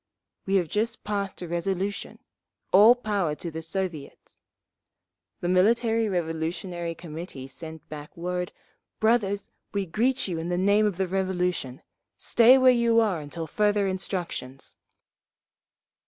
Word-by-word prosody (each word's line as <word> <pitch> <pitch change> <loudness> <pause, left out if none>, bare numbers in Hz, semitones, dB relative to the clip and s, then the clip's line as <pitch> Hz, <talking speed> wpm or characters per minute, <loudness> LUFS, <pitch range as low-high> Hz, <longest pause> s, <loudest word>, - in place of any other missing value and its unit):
We 195 - +2
have 180 -4 +2
just 225 +7 -1
passed 200 -3 -3
a - - -5
resolution, 190 +4 -2 0.6
"All 215 +6 +8
Power 200 -10 -1
to 170 +2 -6
the 160 +1 -5
Soviets."'… 165 -4 -5 1.0
The 175 - -1
Military 225 +4 +3
Revolutionary 170 0 -3
Committee 160 -4 -8
sent 160 +3 -9
back 150 +1 -9
word, 180 +1 -3 0.5
'Brothers! 215 -3 +1 0.2
We 200 -1 0
greet 245 +9 0
you 170 -3 -3
in 165 +2 -4
the 175 - 0
name 200 +3 +4
of 195 -4 -3
the 190 -1 0
Revolution. 180 -8 -2 0.3
Stay 240 +3 +6
where 260 -1 +6
you 235 -2 +3
are 205 -7 +1
until 155 +3 -6
further 205 +4 +1
instructions! 175 -8 -4
185 Hz, 130 wpm, -26 LUFS, 165-210 Hz, 1.0 s, All